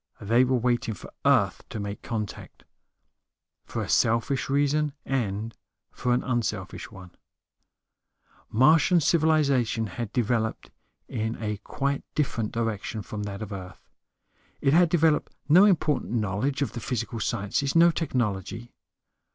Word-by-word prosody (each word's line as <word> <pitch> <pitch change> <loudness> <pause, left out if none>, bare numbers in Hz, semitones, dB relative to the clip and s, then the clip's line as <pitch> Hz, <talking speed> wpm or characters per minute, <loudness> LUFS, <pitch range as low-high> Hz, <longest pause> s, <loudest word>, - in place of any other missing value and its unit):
They 115 +5 +3
were 130 0 +2
waiting 120 -2 0
for - - -12
Earth - - +3
to 110 - -5
make 100 0 -5
contact, 105 -3 -6 1.0
for - - -4
a - - -6
selfish 115 +5 +1
reason 145 +1 +1
and 115 -4 -2 0.4
for 125 - -2
an 125 +1 +2
unselfish 110 -6 -3
one. 95 -1 -12 1.4
Martian 155 - +5
civilization 140 -8 +2
had 110 +3 -5
developed 115 -2 -1 0.4
in 110 -1 -2
a 105 -2 -2
quite 140 +7 -2
different 120 -7 -1
direction 110 -2 -3
from 105 - -6
that 100 +1 -5
of 105 - -7
Earth. 90 -2 -9 0.7
It 135 - +2
had 175 +1 +5
developed 160 -3 +2
no 175 +7 +7
important 160 - +1
knowledge 115 +6 0
of 120 - -3
the 120 - -6
physical 115 -1 -3
sciences, 110 +8 -1
no 170 +1 +7
technology. 120 - -3
120 Hz, 130 wpm, -26 LUFS, 105-140 Hz, 1.4 s, no